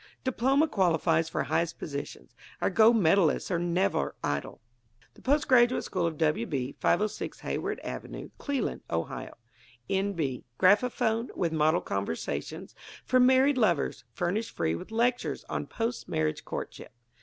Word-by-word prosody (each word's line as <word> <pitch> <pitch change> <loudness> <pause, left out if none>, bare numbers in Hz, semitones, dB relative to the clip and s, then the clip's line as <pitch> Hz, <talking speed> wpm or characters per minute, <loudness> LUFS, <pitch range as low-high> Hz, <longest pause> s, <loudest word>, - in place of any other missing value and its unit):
Diploma 265 +4 +2
qualifies 165 - +2
for - - -1
highest 165 0 -1
positions. 140 - -7 0.3
Our - - +1
Gold 225 +4 +6
Medalists 190 -3 +3
are 170 - +1
never 175 - 0
idle. 70 -1 -2 0.5
The - - -18
Post 285 +3 +2
Graduate 250 -1 +4
School 180 -3 -1
of 160 -2 -4
W. 150 -7 +1
B., 135 -2 -2
506 215 0 0
Hayward - - -3
Avenue, - - -7
Cleland, 280 -3 -2
Ohio. 80 0 -4 0.6
N. 195 +1 +1
B. 140 -8 -2
Graphophone, 225 +3 +3
with 170 -2 -1
Model 155 +2 +3
Conversations 80 -7 -4 0.3
for 255 - +3
Married 260 +2 +5
Lovers, 175 - +1
furnished 200 +6 -2
free 80 - 0
with 85 - -6
lectures 240 +2 0
on - - -3
Post 230 +2 -3
Marriage 75 0 -1
Courtship. - - -6
185 Hz, 140 wpm, -28 LUFS, 155-240 Hz, 0.6 s, Gold